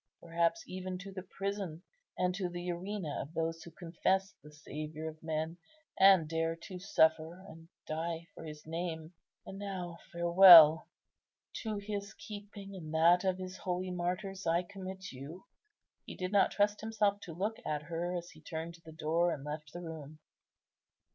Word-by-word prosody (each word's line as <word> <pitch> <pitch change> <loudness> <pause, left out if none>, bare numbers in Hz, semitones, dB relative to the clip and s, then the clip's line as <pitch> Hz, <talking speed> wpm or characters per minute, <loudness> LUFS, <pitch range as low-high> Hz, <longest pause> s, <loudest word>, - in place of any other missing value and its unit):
perhaps 170 - 0
even 185 0 -5
to 195 +1 -9
the 190 -1 -6
prison 195 -3 -4 0.3
and 180 0 +1
to 185 -1 -2
the 175 0 -4
arena 180 -3 -4
of 145 - -8
those 165 0 -1
who - - -10
confess 185 +3 -1
the 150 - -14
Saviour 155 +1 -6
of 155 0 -8
men, 160 +1 -2 0.4
and 190 -5 +7
dare 165 +1 0
to 180 +2 -9
suffer 160 -3 +3
and 165 +1 -13 0.2
die 165 +1 -3
for - - -10
His 150 -1 -9
name. 165 0 -4 0.3
And 195 - -8
now, 180 -4 -5
farewell; 170 -2 +9 0.7
to 215 -2 -3
His 200 0 -5
keeping 205 -1 -9
and 160 -4 -7
that 170 +3 +5
of 185 -1 +1
His 185 0 -7
holy 180 0 -2
martyrs 185 +2 -3
I 170 +2 +3
commit 190 0 -8
you." 140 +8 -9 0.6
He - - -7
did 185 0 -3
not 200 -1 +5
trust 205 0 +1
himself 210 -2 +1
to 170 - -8
look 210 +5 -2
at 150 -1 -2
her 170 +2 -2
as 175 0 -7
he 155 - -16
turned 160 +1 -5
to 170 - -16
the 160 - -11
door, 160 +2 +1
and 140 - -4
left 150 0 -6
the 175 - -7
room. 155 -2 -8
175 Hz, 170 wpm, -33 LUFS, 160-190 Hz, 0.7 s, farewell